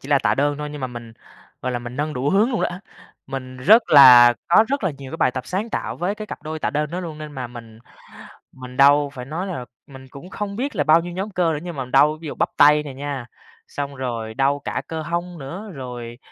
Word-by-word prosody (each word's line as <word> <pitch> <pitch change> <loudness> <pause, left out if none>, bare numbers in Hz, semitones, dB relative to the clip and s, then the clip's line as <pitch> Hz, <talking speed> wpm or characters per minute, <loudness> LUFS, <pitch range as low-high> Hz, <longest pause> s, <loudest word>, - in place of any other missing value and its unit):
chỉ 135 - -11
là 140 -2 +4
tạ - - +1
đơn 145 +1 +1
thôi 150 0 -4
nhưng 150 -1 -8
mà 130 - -2
mình, 120 -2 -9 0.5
gọi 130 - -2
là, 120 - -1
mình 120 +1 -8
nâng 150 +1 -2
đủ 130 +3 -1
hướng 210 +6 +3
luôn 235 - -1
đó. - - +1 0.6
Mình 130 -1 -7
rất 210 - +6
là 125 -4 +9
có 215 +6 +6
rất 275 -6 -1
là 185 - +1
nhiều 135 -2 -9
cái - - -4
bài 130 - +2
tập 130 0 -6
sáng 200 +5 -3
tạo - - -3
với 185 +4 -2
cái 215 0 -8
cặp 150 - -8
đôi 155 +1 -5
tạ - - -1
đơn 150 +1 -2
đó 180 - -4
luôn 160 -4 -7
nên 150 -1 -8
mà 130 -3 -5
mình 115 -2 -12 0.7
mình 125 -1 -11
đau. 145 +1 +5
Phải 125 -2 -7
nói 165 +8 -4
là 130 -10 -5 0.2
mình 135 -1 -13
cũng 140 +8 -12
không 200 0 -5
biết 265 +2 -3
là 145 - +1
bao 155 +2 +5
nhiêu 175 +1 -7
nhóm 190 +4 -4
cơ 175 -3 +1
nữa 150 - -3
nhưng 175 -1 -7
mà 130 -2 -4
đau 145 +4 +3
ví 160 - -7
dụ - - -6
bắp - - 0
tay 150 +1 +6
nè 140 -3 -8
nha, 140 -2 -5 0.4
xong 140 -1 -5
rồi 115 -4 -4
đau 140 +3 +1
cả - - -4
cơ 160 -1 -4
hông 170 +2 -4
nữa, 180 +11 -7
rồi, 120 -4 -8
145 Hz, 260 wpm, -21 LUFS, 130-170 Hz, 0.7 s, là